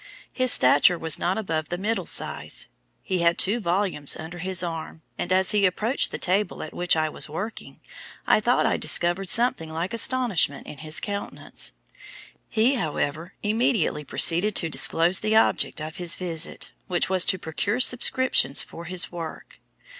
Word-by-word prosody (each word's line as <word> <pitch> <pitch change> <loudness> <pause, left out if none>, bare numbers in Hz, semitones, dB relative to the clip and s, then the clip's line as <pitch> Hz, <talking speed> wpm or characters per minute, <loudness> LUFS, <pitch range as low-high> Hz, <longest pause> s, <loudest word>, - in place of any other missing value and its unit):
His 255 -2 +1
stature 145 +7 +5
was 160 -2 0
not 185 +2 -1
above 160 -7 -3
the 175 - -3
middle 200 -1 -2
size. - - -2 0.4
He 185 -2 -2
had 170 0 +2
two 210 +5 0
volumes 180 -6 -1
under 165 +3 -9
his 185 +1 0
arm, 165 -1 -6
and 175 - -5
as 190 0 +3
he 210 -1 +2
approached 215 +7 0
the - - -5
table 195 +3 -1
at 155 - -9
which 175 -1 +1
I 155 -1 0
was 155 - -3
working, 195 +9 -7 0.4
I - - +3
thought - - +1
I - - +1
discovered 175 +2 +1
something 225 -9 +2
like 170 +7 -4
astonishment 230 - +1
in 145 - -10
his 155 0 -1
countenance. 200 0 -5 0.8
He, 235 +4 +2
however, 160 - -3
immediately 215 - 0
proceeded 175 +8 +3
to 165 - 0
disclose 170 +4 +3
the 215 +1 0
object 220 - +2
of 155 +1 -7
his 175 -1 +1
visit, 170 -2 -3 0.2
which 180 -2 +1
was 185 -1 +5
to 190 - +2
procure 200 +8 -2
subscriptions 250 - +3
for 170 - -11
his 180 +1 -2
work. 170 -2 -9
180 Hz, 165 wpm, -24 LUFS, 165-210 Hz, 0.8 s, stature